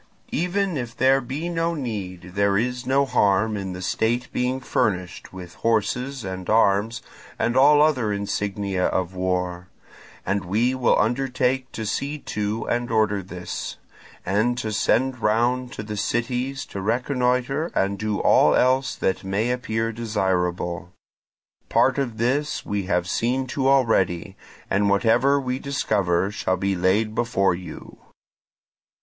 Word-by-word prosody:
Even 180 +1 0
if 120 -3 -5
there 135 +1 +4
be 135 +7 -4
no 170 0 -1
need, 95 - -5
there 100 0 +2
is 125 +3 -2
no 135 +1 +3
harm 105 -2 +2
in 95 -2 -4
the 90 +1 -7
state 120 +6 -1
being 125 +1 0
furnished 95 -8 -2
with 90 -2 -9
horses 115 +4 0
and 95 -1 -6
arms 110 +1 +2 0.3
and 120 - 0
all 145 +2 +6
other 130 -9 +2
insignia 100 -1 -1
of 95 0 -1
war; 90 -1 -2 0.6
and 100 0 0
we 110 +8 +1
will 130 -2 +2
undertake 130 +2 0
to 110 - -4
see 140 +7 -2
to 105 -4 -3
and 120 0 -1
order 110 -3 +1
this, 90 -1 -6 0.5
and 110 +6 +1
to 110 -3 -3
send 130 +4 +1
round 120 +4 +1
to - - -6
the 105 0 -6
cities 125 +6 -2
to 100 - -6
reconnoitre 125 - 0
and 100 0 0
do 105 -1 -1
all - - +4
else 130 +1 +2
that 95 - -1
may 100 +5 0
appear 115 -2 -1
desirable. 90 -6 -1 0.8
Part 135 +1 +3
of 120 -5 -2
this 135 +6 0
we 100 -2 -2
have 90 -2 0
seen 125 +7 0
to 135 -2 0
already, 100 -8 +2 0.3
and 100 +1 +1
whatever 120 +7 +3
we 130 -1 -2
discover 100 -10 0
shall 95 -2 -1
be 95 +1 0
laid 100 +5 +1
before 110 -5 +1
you." 90 +1 -9
110 Hz, 145 wpm, -23 LUFS, 95-130 Hz, 0.8 s, all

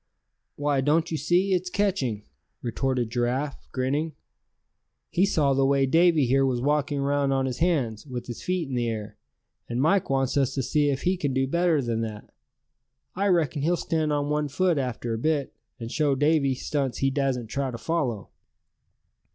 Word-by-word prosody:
"Why, 145 -2 +1
don't 160 +5 +1
you 160 - 0
see, 180 +5 +2
it's 180 0 0
catching," 175 - -1 0.4
retorted 125 0 -1
Giraffe, 125 +4 -2
grinning. 145 +5 -1 1.0
"He 190 +3 +3
saw 145 -7 +2
the 135 0 +2
way 135 0 +3
Davy 165 +1 +4
here 135 +3 +3
was 130 -2 +1
walking 145 +2 0
around 140 0 +1
on 135 0 +1
his 130 -2 -3
hands, 145 -9 0
with 125 -2 -5
his 120 - -7
feet 180 -4 -1
in 135 - -6
the 120 -1 0
air; 110 -1 -5 0.5
and 120 +1 -2
Mike 170 +7 +2
wants 135 0 +1
us 135 -1 +1
to 135 - -1
see 145 +3 +2
if 135 -2 -2
he 185 +1 +1
can 140 -6 -2
do 135 0 +2
better 170 -1 +2
than 115 -1 -1
that. 110 -2 -6 0.8
I 200 +2 +1
reckon 165 -5 +1
he'll 170 +4 +2
stand 160 -2 -1
on 145 0 0
one 150 0 0
foot 165 +2 +1
after 120 -3 -3
a 115 - -3
bit, 150 0 0 0.3
and 115 0 -6
show 145 -3 +1
Davy 145 -1 +2
stunts 135 -1 -2
he 135 0 +1
dassent 130 -5 -1
try 140 -1 -1
to 120 - -5
follow." 125 - -2
140 Hz, 185 wpm, -26 LUFS, 130-160 Hz, 1.0 s, Davy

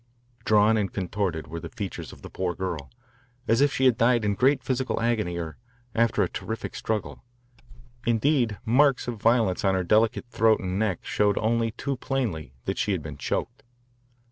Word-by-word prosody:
Drawn 110 +1 +4
and 100 -3 -1
contorted 95 -4 -2
were 85 +3 -6
the - - -8
features - - -6
of - - -15
the - - -8
poor 90 -2 -2
girl, 85 -7 -4 0.6
as 115 +3 +3
if 145 0 +4
she 130 - +1
had 125 -4 +4
died 120 -1 +3
in 100 - +2
great 130 +5 +2
physical 130 +1 -1
agony 110 -7 0
or 80 -2 -5 0.4
after 115 0 +2
a - - +1
terrific 110 0 -5
struggle. 110 -2 -3 0.8
Indeed, 120 -2 +2
marks 130 +3 +3
of 115 -4 -5
violence 115 -5 +2
on 95 -1 +3
her 95 - 0
delicate 110 +4 +2
throat 110 -1 +3
and 95 -1 -2
neck 105 -5 -1
showed 105 -1 +1
only 115 +1 +1
too 135 +4 -4
plainly 110 - -2
that - - -2
she - - +1
had - - -3
been - - -7
choked. 120 - -3
110 Hz, 180 wpm, -26 LUFS, 95-120 Hz, 0.8 s, Drawn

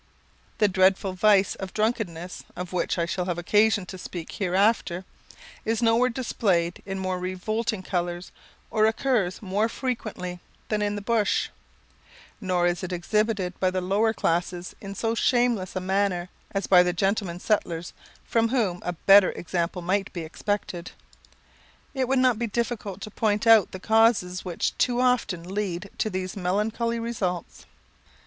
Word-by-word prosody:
The 210 - +4
dreadful 190 0 +2
vice 200 0 +4
of 190 -1 -8
drunkenness, 195 -6 -2
of 180 0 -6
which 180 - 0
I 170 - +1
shall 180 +1 -2
have 175 -2 -2
occasion 205 +3 +3
to 185 +1 -9
speak 175 -2 -7
hereafter, 190 -1 +1 0.6
is 225 +2 0
nowhere 230 +2 +4
displayed 195 -8 0
in 195 0 -3
more 185 -1 -2
revolting 200 +4 -2
colours, 175 -1 -3 0.4
or 215 -1 +4
occurs 220 -5 0
more 205 +3 0
frequently, 215 -9 -4 0.3
than 215 -1 0
in 205 0 0
the 205 - -5
bush; 220 -1 +1 0.9
nor 180 -3 +1
is 175 0 +1
it 185 -1 -5
exhibited 195 +1 0
by 185 - +3
the 185 0 -1
lower 200 +5 +2
classes 175 -2 -1
in 200 -1 -7
so 225 +3 0
shameless 235 -5 +1
a - - 0
manner 185 -1 0 0.2
as 195 0 -2
by 180 -2 +7
the 180 0 +1
gentlemen 195 -1 -1
settlers, 175 -5 -1 0.3
from 230 0 +2
whom 210 -9 0
a 180 - -2
better 195 +3 +6
example 175 +1 -3
might 195 +3 0
be 175 - -4
expected. 175 +1 -4 1.0
It 265 -2 0
would 270 +1 +2
not 255 -3 +3
be 235 - -1
difficult 215 -3 -3
to 215 - -7
point 210 0 0
out 225 -3 +7
the 190 - -7
causes 220 -4 +3
which 175 -3 -2
too 245 -1 +2
often 250 -9 +1
lead 195 -2 -3
to 215 - +1
these 185 -1 -4
melancholy 210 +5 -1
results. 200 -7 -4
195 Hz, 155 wpm, -26 LUFS, 180-220 Hz, 1.0 s, by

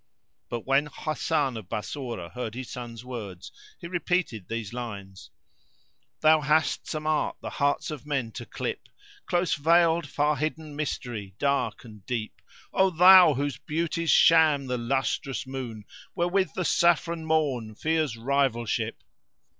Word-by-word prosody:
But 120 -1 -4
when 135 +2 +2
Hasan 150 -3 -1
of 100 -5 -9
Bassorah 115 -5 -5
heard 120 -3 -5
his 130 -1 -6
son's 120 -1 -7
words 105 -8 -7 0.3
he 175 - -11
repeated 175 - -1
these 115 -2 -4
lines:— 100 -6 -7 0.9
"Thou 155 0 +5
hast 155 +2 +1
some 155 0 -4
art 155 -1 0
the - - -5
hearts 145 +2 0
of 150 -4 -7
men 135 -6 -1
to - - -8
clip; - - -5 0.2
* 410 0 -24
Close 175 -1 +1
veiled, 165 +1 +3
far 150 +1 +1
hidden 155 0 -3
mystery 120 -9 -4
dark 140 -2 0
and 105 -4 -13
deep: 115 -4 -4 0.3
O 190 0 +4
thou 180 -2 +8
whose 140 +1 -2
beauties 165 +1 -2
shame 155 -4 +5
the 125 -1 -2
lustrous 135 +2 -1
moon, 125 -5 -6
* - - -21
Wherewith 185 +2 +1
the 185 - -1
saffron 170 -1 +2
Morn 140 -9 0
fears 155 -3 0
rivalship! 120 -2 -1
140 Hz, 145 wpm, -27 LUFS, 120-160 Hz, 0.9 s, thou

